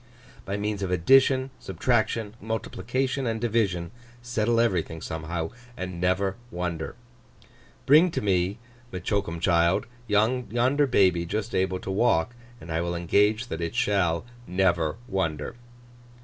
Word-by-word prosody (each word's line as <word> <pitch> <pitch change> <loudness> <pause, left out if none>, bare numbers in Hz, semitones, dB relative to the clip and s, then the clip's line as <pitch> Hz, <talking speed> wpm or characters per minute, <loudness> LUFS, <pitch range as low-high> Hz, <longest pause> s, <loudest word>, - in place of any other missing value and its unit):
By 100 +1 -2
means 105 0 -2
of 95 - -2
addition, 130 +8 +4
subtraction, 115 -3 0
multiplication, 125 +4 -2
and 110 -1 -1
division, 105 -7 0 0.3
settle 115 -1 +1
everything 90 -8 0
somehow, 80 +2 -4 0.3
and 90 -2 -5
never 95 +2 +1
wonder. 90 -5 -4 0.9
Bring 155 +6 +6
to - - -2
me, 95 0 +1 0.3
says 90 -1 -6
M'Choakumchild, 85 -2 +1 0.2
yonder 120 +6 +2
baby 90 -8 +3
just 110 +5 -3
able 95 0 +1
to 95 - -4
walk, 95 -2 +2 0.3
and 80 - -9
I 80 +1 0
will 85 0 -2
engage 105 +7 +2
that 80 - -4
it 85 -1 -3
shall 90 -3 +1 0.2
never 90 -4 +1
wonder. 80 -4 -2
95 Hz, 125 wpm, -26 LUFS, 85-115 Hz, 0.9 s, Bring